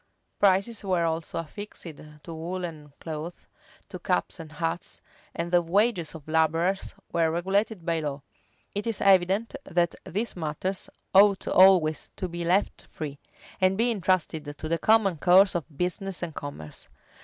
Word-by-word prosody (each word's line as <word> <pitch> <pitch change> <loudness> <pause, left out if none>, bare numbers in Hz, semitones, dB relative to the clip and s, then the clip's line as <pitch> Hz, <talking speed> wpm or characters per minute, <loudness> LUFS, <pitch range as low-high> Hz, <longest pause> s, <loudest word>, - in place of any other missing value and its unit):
Prices 200 +3 +2
were 185 -3 +1
also 165 -1 -2
affixed 205 +6 -6
to 155 0 -10
woollen 165 -2 -6
cloth,[] 160 +2 -7 0.4
to - - -7
caps - - -1
and 155 -2 -9
hats:[v] 165 +2 -4 0.3
and 170 +1 -3
the 175 -1 +5
wages 180 -1 +1
of 155 -2 -11
laborers 165 +4 +1 0.2
were 165 -1 +2
regulated 190 +3 0
by 165 -1 +1
law.[v*] 145 -2 -4 0.5
It 205 +3 -3
is 225 -3 -1
evident, 195 +3 +3
that 170 -1 +1
these 215 +6 -3
matters 175 +3 -3 0.2
ought 200 0 +5
always 180 -5 +5
to 185 - -3
be 175 0 -5
left 180 +4 0
free, 145 -3 -6 0.4
and 185 +1 +3
be 235 +2 +3
intrusted 165 -7 -1
to 155 - -5
the 165 +1 0
common 210 -3 +3
course 190 +4 +6
of 170 -5 -2
business 180 +2 -2
and 165 -2 -4
commerce. 140 - -8
175 Hz, 150 wpm, -27 LUFS, 160-195 Hz, 0.5 s, course